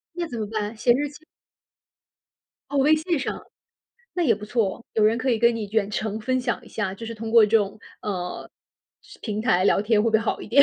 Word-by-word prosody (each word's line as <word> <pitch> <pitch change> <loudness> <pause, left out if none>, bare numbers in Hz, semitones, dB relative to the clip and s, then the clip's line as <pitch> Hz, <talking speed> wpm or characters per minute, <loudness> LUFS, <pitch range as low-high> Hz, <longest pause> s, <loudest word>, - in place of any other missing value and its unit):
那 345 -1 -2
怎 235 -5 -6
么 215 - -1
办？ 215 0 -3
写 240 +2 +3
日 285 +3 -1
记？ 295 +2 -15 1.5
哦， 285 - -1
微 300 +3 +5
信 325 +1 -1
上。 - - -3 0.8
那 350 - +2
也 250 -8 +4
不 210 +1 -9
错， 220 0 -1
有 220 - +1
人 225 +2 +3
可 260 - -2
以 230 -3 +2
跟 235 0 +4
你 215 -2 -4
远 210 -2 +1
程 215 0 -3
分 255 +3 0
享 245 -2 -2
一 - - -14
下， 190 0 -3
就 230 - -9
是 230 - -5
通 225 +1 -6
过 230 -2 +8
这 220 +2 +4
种， 200 0 -3 0.2
呃， 180 -4 -4 0.7
平 215 -1 -3
台 185 -5 +3
聊 200 - +3
天 215 -1 +3
会 230 - +2
不 - - -2
会 - - +7
好 225 - -2
一 - - -8
点？ 270 +6 +7
225 Hz, 250 characters per minute, -24 LUFS, 210-255 Hz, 1.5 s, 过